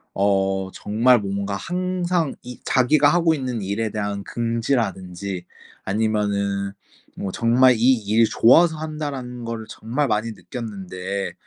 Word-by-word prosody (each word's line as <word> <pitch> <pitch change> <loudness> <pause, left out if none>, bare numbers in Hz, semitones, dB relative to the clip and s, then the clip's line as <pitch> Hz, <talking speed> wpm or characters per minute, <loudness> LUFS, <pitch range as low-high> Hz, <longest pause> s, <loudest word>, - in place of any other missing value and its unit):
어 95 -1 +1
정말 115 +3 +3
뭔가 100 0 -3
항상 180 - -1
이 125 0 -9
자기가 140 +3 +4
하고 170 -2 +3
있는 125 -6 -3
일에 105 +3 -2
대한 100 -1 -3
긍지라든지 100 -6 -2 0.4
아니면은 100 -2 0 0.4
뭐 95 - -4
정말 120 +3 +4
이 125 +4 +5
일이 110 0 +2
좋아서 160 +9 +5
한다라는 145 -6 -5
거를 115 -1 -5
정말 130 +6 -2
많이 110 +1 0
느꼈는데 100 -4 -5
115 Hz, 265 characters per minute, -22 LUFS, 100-130 Hz, 0.4 s, 이